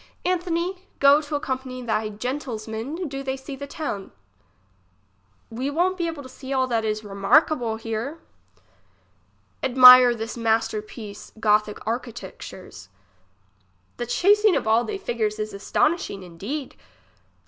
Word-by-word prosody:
Anthony, 355 0 -1 0.2
go 280 +2 +6
to 295 0 -5
accompany 260 -3 -4
they 220 -2 -1
gentilsmen, 245 - -4
do 275 -1 -5
they 265 0 -3
see 265 +1 -8
the 280 +1 -7
town. 280 -10 -5 1.4
We 255 +5 -3
won't 360 +5 0
to 325 -5 -3
see 260 +1 -10
all 260 -1 +2
that 230 -3 -1
is 215 -1 -1
it - - -8
remarquable 230 +4 +2
here. 225 +7 -4 1.4
Admire 250 -1 +8
this 225 0 -5
master 225 -2 0
piece 210 -1 -10
gothic 210 -1 +1
architecture's. 215 - -7 1.1
The 240 - -4
chasing 410 - +4
of - - -1
all 225 +2 +4
they 405 - -4
figures 225 - -2
is 215 0 -4
astonishing 200 - 0
indeed. 205 - -6
250 Hz, 125 wpm, -24 LUFS, 220-290 Hz, 1.4 s, Admire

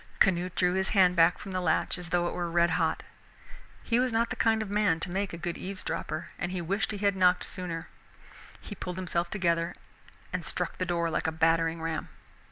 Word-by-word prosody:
Canute 180 -1 +2
drew 180 -1 +2
his 190 0 0
hand 180 -2 +6
back 165 +1 +5
from 195 - -8
the 185 0 -1
latch 180 - +1
as 175 -2 -6
though 175 0 +2
it - - -3
were 175 -1 -2
red 170 0 +3
hot. 165 -1 0 0.8
He 235 0 +2
was 255 0 +2
not 230 +1 +1
the - - -1
kind 220 -1 +2
of 210 - -8
man 205 -6 +2
to 175 - -4
make 195 +1 -1
a 170 - -6
good 170 0 -4
eavesdropper, 185 -4 -4
and 180 - -2
he 185 - -2
wished 195 +4 -1
he 210 - -3
had 200 -1 +2
knocked 180 -1 +4
sooner. 170 -3 -5 0.7
He - - -8
pulled 180 -3 -5
himself 175 -2 -1
together 170 -3 0 0.6
and 180 -1 -2
struck 175 +3 -3
the 185 - -1
door 170 -1 0
like - - 0
a - - +1
battering 165 0 +2
ram. 165 -1 -3
180 Hz, 215 wpm, -29 LUFS, 170-190 Hz, 0.8 s, hand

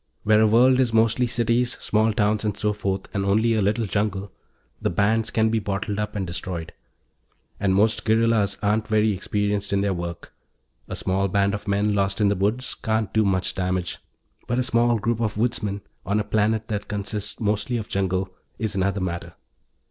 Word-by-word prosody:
Where 110 0 +4
a 110 - +5
world 125 +4 +5
is 125 -3 +2
mostly 115 +2 +3
cities, 120 +1 +1
small 110 +1 +2
towns, 105 0 +1
and 105 -2 -1
so 105 0 0
forth, 100 -2 -2
and 100 - -1
only 110 +4 +2
a 110 - +1
little 105 +3 +1
jungle, 100 -1 -2 0.5
the - - +1
bands 110 +5 +1
can 110 -1 +2
be 115 - +2
bottled 100 0 -3
up 105 0 -3
and 100 -2 -1
destroyed. 85 -1 -5 0.9
And 95 -2 +2
most 110 +2 +2
guerrillas 110 -2 +2
aren't 105 +1 +1
very 110 0 +3
experienced 105 +1 -1
in 100 0 +2
their 100 -1 +1
work; 85 -1 -6 0.5
a - - -5
small 95 +1 0
band 100 +1 +1
of 105 +1 -5
men 100 +1 +1
lost 100 0 0
in 105 -2 +4
the 100 - +1
woods 105 +7 0
can't 110 -1 -2
do 110 - +3
much 95 -2 0
damage. 90 -1 -2 0.5
But 120 - 0
a 130 - +2
small 120 -1 +2
group 115 +1 -1
of 110 -2 -1
woodsmen, 105 -3 -1 0.2
on 105 +2 0
a - - 0
planet 110 +1 0
that 105 -1 -3
consists 105 +1 -3
mostly 110 +3 0
of 110 - -5
jungle, 95 -1 -1 0.3
is 110 -2 -2
another 100 0 0
matter. 85 -2 -4
105 Hz, 190 wpm, -24 LUFS, 100-110 Hz, 0.9 s, a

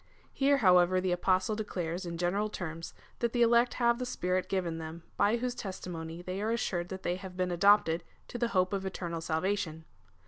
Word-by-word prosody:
^ - - -35 0.3
Here, 280 +1 +3
however, 185 -4 +5
the 185 0 0
Apostle 185 +3 +1
declares 180 -4 -3
in 170 0 -4
general 195 +5 0
terms, 165 -4 -6 0.2
that 235 -1 0
the 240 -1 +4
elect 235 +1 +4
have 235 -1 +2
the 250 - -2
Spirit 185 -5 -1
given 175 -4 -1
them, 160 +1 -7
by 205 +3 +3
whose 245 +1 -2
testimony 175 -6 -6
they 185 +2 -4
are 215 - 0
assured 175 -6 -1
that 190 0 -6
they 175 +1 -1
have 185 -1 -9
been 185 -1 0
adopted 175 -2 +4 0.3
to 240 - -5
the 235 - +2
hope 185 -4 +1
of 195 -1 -1
eternal 175 -3 -4
salvation. 160 -1 -2
185 Hz, 200 wpm, -31 LUFS, 175-210 Hz, 0.3 s, however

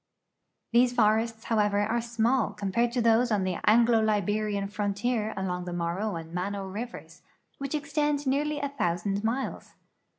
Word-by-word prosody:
These 245 +1 +4
forests, 225 0 +2
however, 210 -2 +1
are 225 +3 0
small 235 +1 +1
compared 230 +5 0
to 245 -2 +1
those 230 +1 +4
on 205 -3 +2
the 185 -2 -1
Anglo 230 +1 +5
Liberian 210 -1 0
frontier 210 +2 -1
along 180 -2 -2
the 175 - -5
Morro 175 +5 -2
and 165 0 -7
Mano 195 +2 -3
rivers, 220 +6 -7 0.4
which 275 +2 -3
extend 290 0 -1
nearly 290 +3 0
a 280 - -2
thousand 195 -5 -1
miles. 245 +4 -3
220 Hz, 145 wpm, -28 LUFS, 200-240 Hz, 0.4 s, Anglo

